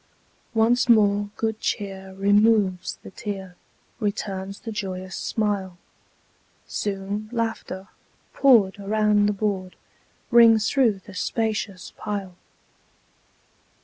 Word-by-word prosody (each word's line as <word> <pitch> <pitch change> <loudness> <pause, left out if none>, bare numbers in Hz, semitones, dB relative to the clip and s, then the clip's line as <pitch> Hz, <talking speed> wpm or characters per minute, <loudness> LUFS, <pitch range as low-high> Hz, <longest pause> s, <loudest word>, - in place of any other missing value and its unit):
Once 235 +3 +3
more 205 -2 +4
good 220 -1 -1
cheer 195 -2 -4
removes 205 -1 +2
the - - -10
tear, 195 -3 -6 0.4
Returns 200 -2 -3
the 225 - -6
joyous 185 -3 -5
smile; 200 -4 -2 0.9
Soon 205 +1 -3
laughter, 225 -5 -3 0.5
poured 220 -8 +4
around 210 0 +2
the - - +2
board, 195 -3 -2 0.6
Rings 225 -2 +6
through 230 -8 +2
the 200 - -11
spacious 210 -1 -2
pile. 195 -3 -4
205 Hz, 95 wpm, -24 LUFS, 195-220 Hz, 0.9 s, Rings